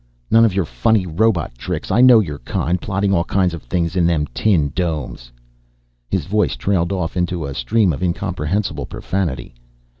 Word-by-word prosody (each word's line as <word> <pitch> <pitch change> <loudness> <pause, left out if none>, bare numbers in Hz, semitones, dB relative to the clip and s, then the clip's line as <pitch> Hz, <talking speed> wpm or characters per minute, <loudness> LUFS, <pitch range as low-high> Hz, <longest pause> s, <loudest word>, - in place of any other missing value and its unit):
None 115 0 +6
of 105 -5 0
your 95 -3 +1
funny 110 +2 +1
robot 90 - 0
tricks. - - -4
I 110 +6 +4
know 125 -3 +8
your 75 -8 -3
kind, 85 +8 -2
plotting 100 0 0
all 85 -3 +2
kinds 90 -1 0
of 85 - -6
things 85 +7 -2
in 85 -2 +3
them 80 -3 +1
tin 85 -10 +2
domes." 75 -9 -3 0.8
His - - -1
voice 105 0 0
trailed 95 -3 0
off 90 -4 -2
into 90 -2 -1
a 70 - -5
stream 100 +5 +1
of 70 - -6
incomprehensible 90 -3 -2
profanity. 75 -11 -3
90 Hz, 175 wpm, -19 LUFS, 80-100 Hz, 0.8 s, know